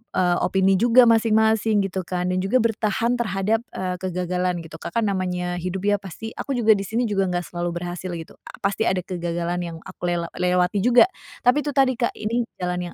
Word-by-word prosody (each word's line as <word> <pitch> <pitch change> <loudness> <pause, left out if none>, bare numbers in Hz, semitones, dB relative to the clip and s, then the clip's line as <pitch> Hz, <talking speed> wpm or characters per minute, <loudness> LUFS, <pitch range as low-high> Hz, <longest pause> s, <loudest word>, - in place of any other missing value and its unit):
eee, 175 -1 +2
opini 190 0 +2
juga 240 +3 +6
masing-masing, 220 -2 +3
gitu, 185 -2 -4
kan. 180 0 -1
Dan 185 - 0
juga 210 +6 +2
bertahan 230 +2 0
terhadap, 210 0 0 0.2
eee, 185 -1 -2
kegagalan, 180 -1 -2
gitu. 160 0 -11
Kak, 170 - -8
kan, 230 - +2
namanya 180 -2 -2
hidup 185 +2 -4
dia 205 -1 +2
pasti 200 +4 -8
aku 275 - -2
juga 225 -2 +4
di 200 -2 +3
sini 230 +3 0
juga 200 -4 0
enggak 180 -1 -1
selalu 175 0 -3
berhasil, 175 +1 -5
gitu. 165 -1 -10
A - - -10
pasti 200 +3 0
ada 185 -1 0
kegagalan 175 0 -3
yang 170 -2 -5
aku 175 - -6
lela 170 -1 -1
lewati 180 +2 +1
juga, 250 +9 +6 0.3
tapi 260 +4 +3
itu 290 - -2
tadi, 265 -3 +3
Kak, 235 - 0
ini 230 +3 -1 0.2
jalan 180 -1 -3
190 Hz, 200 wpm, -23 LUFS, 180-225 Hz, 0.3 s, juga